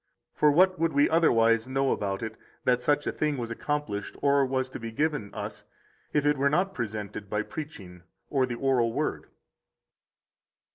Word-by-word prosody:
For 150 - +4
what 185 +4 +4
would 165 0 +1
we 145 +1 +4
otherwise 115 -8 +3
know 135 0 +1
about 100 0 -2
it, 110 0 -5 0.3
that 125 -1 +2
such 145 +2 +1
a - - 0
thing 150 -2 -1
was 115 -2 -4
accomplished 115 -5 -3
or 140 0 +4
was 130 0 0
to - - -7
be 115 -1 -5
given 145 -4 -1
us - - -7 0.5
if 150 -1 +1
it 145 0 +3
were 140 +1 +3
not 185 +6 +1
presented 105 - -5
by 105 0 0
preaching 100 - -8 0.3
or 135 -3 +1
the 120 - -3
oral 125 -2 +2
Word? - - -2
130 Hz, 175 wpm, -28 LUFS, 115-150 Hz, 0.5 s, For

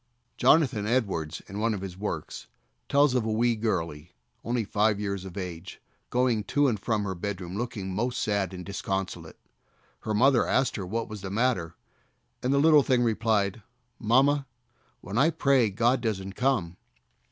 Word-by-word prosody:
Jonathan 125 -6 +3
Edwards, 100 -10 -1
in 100 +2 -6
one 110 0 +1
of 95 - -6
his 95 -2 -6
works, 95 -5 -5 0.4
tells 145 -1 +4
of 125 -3 +1
a 110 - -2
wee 115 +2 +2
girlie, 85 -8 -3 0.3
only 120 0 -1
five 105 0 +1
years 100 -2 -3
of 95 0 -9
age, 90 -2 -6 0.3
going 125 -3 +1
to 145 +6 +2
and 110 -5 0
from 110 +1 -1
her 100 -2 -2
bedroom 95 -1 -5
looking 105 -4 -4
most 120 +5 -1
sad 100 -2 0
and 90 -1 -8
disconsolate. 95 -4 -4 0.6
Her 110 -1 -3
mother 130 +2 +4
asked 130 -1 +1
her 95 -4 -4
what 115 +4 -2
was 105 -2 -8
the 95 - -5
matter, 100 -6 0 0.7
and 125 - 0
the 140 - +3
little 150 +1 +6
thing 130 -2 +2
replied, 110 -2 +1 0.4
"Mamma, 135 +5 +3 0.5
when 105 +5 -3
I 150 +5 +5
pray 135 -7 +3
God 120 +5 +1
doesn't 95 -4 -3
come." 110 -9 0
110 Hz, 165 wpm, -27 LUFS, 95-125 Hz, 0.7 s, little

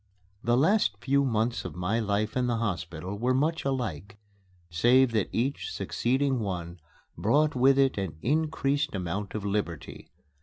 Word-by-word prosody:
The 120 +1 +2
last 200 +10 +3
few 140 +1 +1
months 115 -2 0
of 90 -5 -7
my 90 +6 0
life 105 0 -1
in 125 -1 +1
the 120 -1 0
hospital 90 -3 -4
were 125 +2 +1
much 155 +5 0
alike, 110 - -3 0.5
save 120 +9 +4
that 110 -4 0
each 130 +5 -2
succeeding 130 +2 0
one 90 -4 -4 0.4
brought 150 +8 +2
with 135 +2 +4
it 135 -6 +3
an 90 -6 -4
increased 145 -1 0
amount 95 +3 -4
of 105 -2 -4
liberty. 100 -6 -4
115 Hz, 150 wpm, -28 LUFS, 100-135 Hz, 0.5 s, save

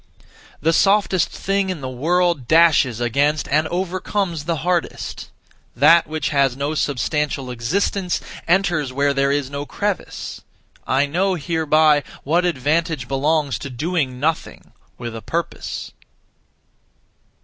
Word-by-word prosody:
The 165 +2 +2
softest 195 0 +3
thing 195 0 -1
in 180 -6 -4
the 130 - -4
world 160 +2 0
dashes 155 -7 +4
against 140 +6 +1
and 155 +3 +2
overcomes 180 -2 -2
the 170 0 0
hardest; 175 -2 -2 0.5
that 160 +7 +5
which 155 0 -2
has 140 -3 +2
no 140 +2 -1
(substantial) 145 -2 -1
existence 180 - -1 0.3
enters 175 -6 +1
where 140 +2 +1
there 140 0 +1
is 140 -1 -1
no 140 +1 -5
crevice. 205 -2 -4 0.5
I 135 +2 +2
know 185 +6 0
hereby 155 -2 +3 0.2
what 170 +5 +2
advantage 160 -2 0
belongs 145 +1 0
to 140 - -6
doing 135 -1 -2
nothing 155 +4 -2 0.3
(with 120 -2 -6
a 115 - -6
purpose). 170 +7 -4
155 Hz, 125 wpm, -21 LUFS, 140-175 Hz, 0.5 s, that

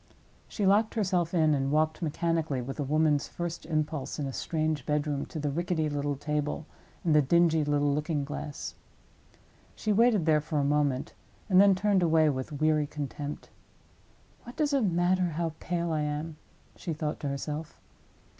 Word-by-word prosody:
She 205 - -2
locked 210 +4 +3
herself 180 -6 +1
in 155 -4 +3
and 135 -1 0
walked 155 +2 +1
mechanically, 160 -3 -1
with 135 +4 -6
a - - +1
woman's 150 0 +2
first 170 -2 -5
impulse 155 -3 -2
in 145 - -2
a 135 - -4
strange 155 -2 -1
bedroom, 150 -1 -1
to - - -8
the 145 -1 -1
rickety 165 0 -1
little 145 0 -1
table 150 +2 -2 0.4
and 165 - +2
the 150 - +6
dingy 160 +2 +3
little 145 -1 +1
looking 150 -1 -1
glass. 145 0 -6 1.0
She 215 - 0
waited 220 -5 +4
there 155 -2 +4
for 155 +1 -3
a 145 - +2
moment, 145 0 0 0.4
and 185 +1 +7
then 200 -1 +6
turned 200 0 +2
away 160 -2 +4
with 130 +2 -4
weary 155 0 +1
contempt. 145 0 -6 0.9
"What 240 - -11
does 300 -2 0
it 275 - +3
matter 175 -1 +1
how 165 -2 -1
pale 170 0 -2
I 155 -1 0
am?" 150 +1 -3 0.4
she 170 - -4
thought 150 0 -3
to 145 - -4
herself. 150 +3 -5
155 Hz, 170 wpm, -29 LUFS, 145-170 Hz, 1.0 s, and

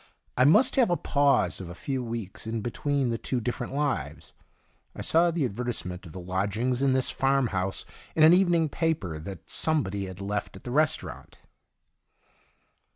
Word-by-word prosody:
I 130 - +4
must 210 - +5
have 250 -7 +4
a 175 - +2
pause 140 -7 +2
of 90 - -7
a 90 - -8
few 130 +5 -3
weeks 115 -3 -5
in 110 0 -2
between 135 +3 -1
the 115 - -2
two 130 - -1
different 120 +2 -4
lives. 130 - -2 0.6
I - - -6
saw 170 +2 +3
the 165 -4 0
advertise 120 +1 -3
ment 90 0 -7
of - - -11
the 90 - -8
lodgings 100 +8 -1
in 135 -1 +3
this 130 0 +1
farm 135 -2 +1
house 95 0 -2 0.3
in 155 - +4
an 160 +2 +8
evening 175 -3 +3
paper 140 - -2
that 85 +2 -9
somebody 100 -12 0
had 95 0 -9
left 100 +1 -3
at - - -12
the 125 - -6
restaurant. 155 +3 -1
125 Hz, 175 wpm, -27 LUFS, 100-145 Hz, 0.6 s, an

